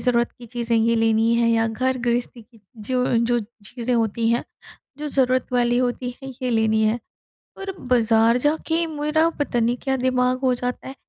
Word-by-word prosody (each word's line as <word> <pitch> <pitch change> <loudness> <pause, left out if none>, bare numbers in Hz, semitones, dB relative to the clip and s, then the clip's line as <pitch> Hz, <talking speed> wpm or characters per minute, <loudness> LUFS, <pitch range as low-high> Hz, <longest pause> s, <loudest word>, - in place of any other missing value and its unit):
ज़रूरत 240 -1 +1
की 240 - -11
चीज़ें 235 0 -1
ये 230 +1 +2
लेनी 225 0 +2
है 235 0 +2
या 225 0 +2
घर-गृहस्ती 245 0 -1
की 225 0 -23 0.3
जो 255 -1 +1
जो 235 +1 +2 0.3
चीज़ें 245 +3 -3
होती 225 0 0
हैं, 235 +1 +1 0.5
जो 300 0 -4
ज़रूरत 255 -2 +1
वाली 240 -1 +2
होती 250 0 -1
है 270 - -7
ये 250 - 0
लेनी 220 -1 +2
है। 215 +2 +1 0.6
पर 390 0 -5
बाज़ार 230 -2 +3
जाके 320 +4 0
मेरा 310 +1 +1
पता 280 -5 0
नहीं 235 +2 +1
क्या 270 -1 0
दिमाग 255 0 +1
हो 255 -1 +3
जाता 245 +1 -4
है, 265 - -8
245 Hz, 180 wpm, -22 LUFS, 230-255 Hz, 0.6 s, बाज़ार